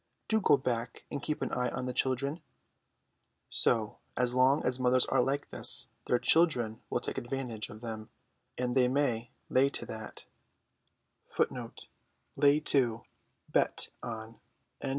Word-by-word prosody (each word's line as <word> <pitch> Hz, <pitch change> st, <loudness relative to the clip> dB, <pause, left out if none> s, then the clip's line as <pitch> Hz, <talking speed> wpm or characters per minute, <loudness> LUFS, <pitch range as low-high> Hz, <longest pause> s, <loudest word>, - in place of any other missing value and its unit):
Do 220 Hz, 0 st, +2 dB
go 150 Hz, -6 st, +5 dB
back 120 Hz, -3 st, -3 dB
and 145 Hz, -, -4 dB
keep 150 Hz, 0 st, -3 dB
an -, -, -3 dB
eye 125 Hz, 0 st, 0 dB
on 125 Hz, -, -4 dB
the 125 Hz, -, -3 dB
children." 135 Hz, +5 st, -1 dB, 1.1 s
So 110 Hz, -3 st, +2 dB, 0.2 s
long 130 Hz, +3 st, +3 dB
as 125 Hz, 0 st, +1 dB
mothers 125 Hz, 0 st, +3 dB
are -, -, +2 dB
like 140 Hz, +3 st, -2 dB
this -, -, +2 dB, 0.2 s
their 125 Hz, -, +2 dB
children 120 Hz, -8 st, +3 dB
will -, -, -1 dB
take -, -, -4 dB
advantage 120 Hz, -3 st, -4 dB
of 110 Hz, -, -11 dB
them; 110 Hz, -2 st, -6 dB, 0.5 s
and 125 Hz, 0 st, -1 dB
they 125 Hz, -2 st, +4 dB
may 125 Hz, -4 st, 0 dB, 0.2 s
lay 135 Hz, +2 st, +3 dB
to -, -, -3 dB
that. 110 Hz, -1 st, -9 dB
125 Hz, 120 wpm, -31 LUFS, 120-135 Hz, 1.1 s, go